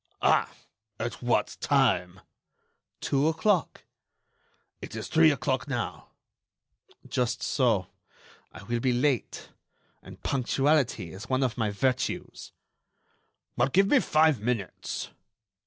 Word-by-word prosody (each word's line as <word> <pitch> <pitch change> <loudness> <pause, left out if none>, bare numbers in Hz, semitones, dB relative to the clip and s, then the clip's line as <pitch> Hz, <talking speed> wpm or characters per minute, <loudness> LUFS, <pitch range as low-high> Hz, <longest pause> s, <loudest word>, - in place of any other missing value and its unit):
"Ah! - - +3 0.5
at 115 0 -4
what 120 -1 0
time?" 95 -10 +1 0.8
"Two 140 +2 +1
o'clock." 165 +2 0 1.0
"It - - -8
is - - -5
three 160 0 +5
o'clock 145 -2 -1
now." 120 -4 -4 1.0
"Just 125 -1 -1
so; 115 -8 +1 0.7
I - - -12
will 120 +3 -2
be 125 +1 +1
late. 125 0 -1 0.5
And - - -14
punctuality 135 - +1
is 95 +6 -9
one 130 +1 +1
of 125 -3 -1
my 110 -3 0
virtues." 125 +5 -2 1.0
"Well, - - +2
give 195 +7 +3
me 285 - +6
five 155 - +3
minutes." 110 -4 -3
130 Hz, 110 wpm, -27 LUFS, 115-145 Hz, 1.0 s, me